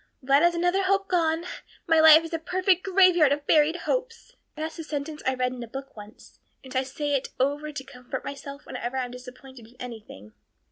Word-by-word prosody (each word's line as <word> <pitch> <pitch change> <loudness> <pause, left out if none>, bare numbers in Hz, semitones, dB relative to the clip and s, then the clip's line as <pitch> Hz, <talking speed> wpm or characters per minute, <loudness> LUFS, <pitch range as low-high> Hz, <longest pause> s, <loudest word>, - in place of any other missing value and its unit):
"Well, 275 +2 +4
that 340 - +5
is 345 - -7
another 355 +3 +1
hope 390 +1 +1
gone. 330 -1 +1 0.4
'My 325 -3 +4
life 315 0 +8
is 330 - -8
a 330 - -1
perfect 370 +2 +1
graveyard 365 -6 +4
of 285 0 -1
buried 310 +1 +4
hopes.' - - -3 0.2
That's 315 +2 -5
a - - -4
sentence 300 0 -5
I 260 - +1
read 250 0 -1
in 250 - -8
a 235 - -6
book 270 +4 -9
once, 210 0 -14 0.2
and 260 0 -11
I 260 - +3
say 285 +2 -3
it 275 -1 0
over 290 +3 0
to 285 -2 -6
comfort 250 -2 -8
myself 280 0 -8
whenever 245 +3 -5
I'm 250 -2 -3
disappointed 250 -1 -12
in 240 - -21
anything." 215 - -10
290 Hz, 205 wpm, -26 LUFS, 255-330 Hz, 0.4 s, life